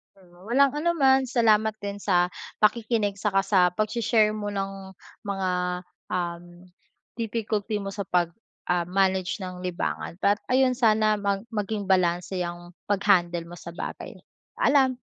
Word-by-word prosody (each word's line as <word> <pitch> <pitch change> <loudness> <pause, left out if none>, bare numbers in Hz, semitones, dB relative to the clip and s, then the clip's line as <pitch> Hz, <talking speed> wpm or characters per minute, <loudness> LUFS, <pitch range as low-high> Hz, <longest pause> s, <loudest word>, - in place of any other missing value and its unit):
Pero 180 0 -18
walang 270 +4 +4
anuman. 290 -4 +3
Salamat 220 -3 +3
din 200 0 -5
sa 180 -3 +2 0.3
pakikinig 215 -2 +2
saka 195 -1 +2
sa 195 -1 +2
pagshe-share 215 +1 +2
mo 210 -1 -4
ng 195 -1 -5 0.3
mga, 195 -2 -1 0.6
um, 175 -1 -2 0.7
difficulty 220 -2 -2
mo 195 - -4
sa 200 0 -5
pag, 175 -2 +2 0.4
ah, 175 -1 +2
manage 190 +1 0
ng 185 -1 -6
libangan 175 -1 -3
at 205 +1 +3 0.2
ayun, 260 -1 +4
sana 215 -3 +3
mag 200 -1 0
maging 210 -2 -3
balanse 180 0 +1
ang 175 0 -8
pag-handle 185 -4 +2
mo 175 - -9
sa 170 - -9
bagay. - - -6 0.5
Paalam. 265 -3 +3
200 Hz, 135 wpm, -26 LUFS, 185-220 Hz, 0.7 s, walang